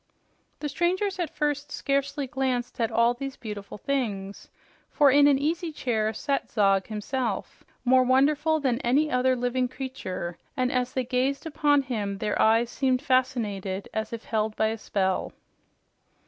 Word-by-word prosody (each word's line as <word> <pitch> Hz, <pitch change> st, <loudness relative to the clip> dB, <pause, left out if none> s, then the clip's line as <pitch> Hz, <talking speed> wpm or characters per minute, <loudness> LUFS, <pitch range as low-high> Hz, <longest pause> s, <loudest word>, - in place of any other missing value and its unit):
The 300 Hz, -, -1 dB
strangers 365 Hz, +6 st, 0 dB
at 345 Hz, -, -1 dB
first 290 Hz, -1 st, -1 dB
scarcely 280 Hz, 0 st, -1 dB
glanced 260 Hz, -3 st, -2 dB
at 225 Hz, -, +2 dB
all 235 Hz, +1 st, +3 dB
these 275 Hz, +2 st, -6 dB
beautiful 210 Hz, -3 st, -7 dB
things, 205 Hz, -7 st, -3 dB, 0.4 s
for 290 Hz, -3 st, +4 dB
in 285 Hz, +1 st, +6 dB
an 280 Hz, -2 st, +5 dB
easy 325 Hz, +4 st, -1 dB
chair 220 Hz, -7 st, -1 dB
sat 275 Hz, +4 st, -2 dB
Zog 195 Hz, -3 st, +2 dB
himself, 220 Hz, 0 st, -3 dB, 0.2 s
more 255 Hz, +1 st, +6 dB
wonderful 290 Hz, +5 st, +3 dB
than 255 Hz, -4 st, 0 dB
any 285 Hz, +6 st, +2 dB
other 255 Hz, +1 st, +3 dB
living 250 Hz, +1 st, 0 dB
creature, 245 Hz, -10 st, -5 dB, 0.2 s
and 255 Hz, -1 st, +1 dB
as 250 Hz, 0 st, -1 dB
they 260 Hz, -1 st, -1 dB
gazed 260 Hz, +4 st, 0 dB
upon 290 Hz, -2 st, +2 dB
him, 210 Hz, -6 st, -3 dB
their 210 Hz, -, -1 dB
eyes 230 Hz, +2 st, +4 dB
seemed 260 Hz, -1 st, +1 dB
fascinated 220 Hz, -8 st, 0 dB
as 220 Hz, 0 st, -3 dB
if 230 Hz, -1 st, -6 dB
held 215 Hz, -1 st, -1 dB
by 220 Hz, -, +2 dB
a 225 Hz, -, -3 dB
spell. 190 Hz, -3 st, -1 dB
255 Hz, 155 wpm, -26 LUFS, 220-280 Hz, 0.4 s, in